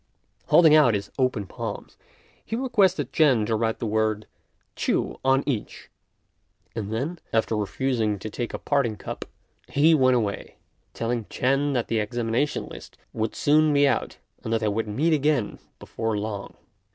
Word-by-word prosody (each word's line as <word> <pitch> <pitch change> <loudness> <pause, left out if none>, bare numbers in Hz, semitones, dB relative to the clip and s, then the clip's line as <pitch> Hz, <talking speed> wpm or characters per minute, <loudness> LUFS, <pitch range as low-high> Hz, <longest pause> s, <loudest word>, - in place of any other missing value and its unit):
Holding 160 -3 +6
out 145 -8 +6
his 100 0 -4
open 125 -6 +1
palms, - - -7 0.5
he 225 - -4
requested 190 - +1
Ch'ên 130 -9 +4
to 110 0 0
write 110 0 0
the - - -4
word 110 0 0 0.5
Ch'u - - -1
on 135 +1 +3
each; 120 -8 -4 0.8
and 105 -2 -4
then, 145 +10 -3
after 110 0 +1
refusing 110 0 -1
to 100 - -7
take 115 +2 -4
a - - -4
parting 135 -7 0
cup, - - -6 0.4
he 155 +3 +4
went 130 -4 +4
away, 105 -4 -2 0.4
telling 115 -1 -2
Ch'ên 135 +5 0
that 120 - 0
the 115 - 0
examination 120 +6 -1
list - - -12 0.2
would 110 0 -2
soon 155 +1 +3
be 140 0 +5
out, - - -1 0.3
and 110 - -4
that 115 0 +1
they 110 - 0
would 110 +2 -1
meet 145 +11 +1
again 145 -6 0 0.2
before 115 -1 -3
long. 105 -1 -5
120 Hz, 160 wpm, -25 LUFS, 110-145 Hz, 0.8 s, Holding